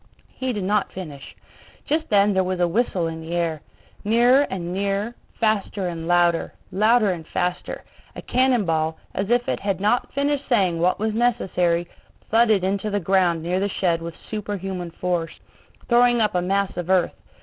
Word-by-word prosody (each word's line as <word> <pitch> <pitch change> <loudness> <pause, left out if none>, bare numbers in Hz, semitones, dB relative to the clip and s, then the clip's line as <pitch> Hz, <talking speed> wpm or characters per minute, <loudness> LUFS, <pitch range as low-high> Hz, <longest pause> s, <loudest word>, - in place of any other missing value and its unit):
He 260 -1 -3
did 210 -5 -3
not 205 +2 0
finish. 150 -7 -9 0.5
Just 315 +2 -1
then 205 -1 +4
there 190 0 +2
was 185 0 -2
a 175 - +3
whistle 185 -2 0
in 165 0 -4
the 165 +2 -5
air; 165 -3 -1 0.4
nearer 240 +6 +4
and 175 -2 -4
nearer, 200 +4 -1 0.3
faster 210 -3 0
and 165 -2 -5
louder, 175 -1 +2 0.2
louder 215 +1 +3
and 165 -3 -6
faster, 180 0 -3 0.3
a - - -8
cannon 250 -4 +2
ball, 160 -1 0 0.2
as 195 +2 -2
if 245 0 +2
it - - -1
had 195 -2 -2
not 215 +5 +1
finished 285 0 -1
saying 190 -9 +2
what 180 +2 +2
was 220 0 -1
necessary, 180 -7 +1 0.4
thudded 220 -4 +4
into 200 +2 -1
the 205 0 0
ground 180 -3 +2
near 180 +2 0
the 200 +1 0
shed 170 -4 0
with 165 0 -6 0.2
super 210 -1 -3
human 185 -2 -5
force, 170 -1 -3 0.5
throwing 240 0 +4
up 215 -2 +2
a 180 - +1
mass 195 +2 0
of 175 0 -4
earth. 185 -2 +3
190 Hz, 180 wpm, -23 LUFS, 175-220 Hz, 0.5 s, then